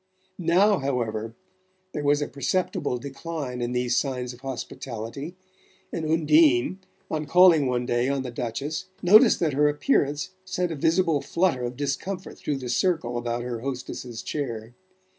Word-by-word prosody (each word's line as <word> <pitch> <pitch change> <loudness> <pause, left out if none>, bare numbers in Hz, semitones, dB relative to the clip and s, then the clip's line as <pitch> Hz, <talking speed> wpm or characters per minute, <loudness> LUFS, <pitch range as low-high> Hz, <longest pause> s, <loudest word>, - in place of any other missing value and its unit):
Now, 185 +4 +4
however, 115 -4 -2 0.6
there 150 - -4
was 145 +1 +3
a - - -3
perceptible 140 -2 -1
decline 140 -1 -5
in 120 0 -1
these 125 0 0
signs 125 -3 -1
of 120 - -14
hospitality, 135 +3 -6 0.6
and 160 -2 -2
Undine, 155 -1 +4 0.3
on 155 -1 -2
calling 175 -5 +6
one 125 -1 0
day 120 +2 +1
on 140 -1 0
the 125 - -5
Duchess, 130 +7 -3 0.2
noticed 215 +6 +7
that 160 -4 +1
her 150 +2 +4
appearance 145 0 +1
sent 180 -2 -2
a - - -3
visible 160 0 +2
flutter 170 -7 +1
of 120 0 -4
discomfort 170 +7 -4
through 145 - -2
the 130 -2 -6
circle 160 -3 +1
about 120 0 -2
her 120 -2 -4
hostess's 125 -2 -5
chair. 120 -6 -4
140 Hz, 150 wpm, -25 LUFS, 125-160 Hz, 0.6 s, noticed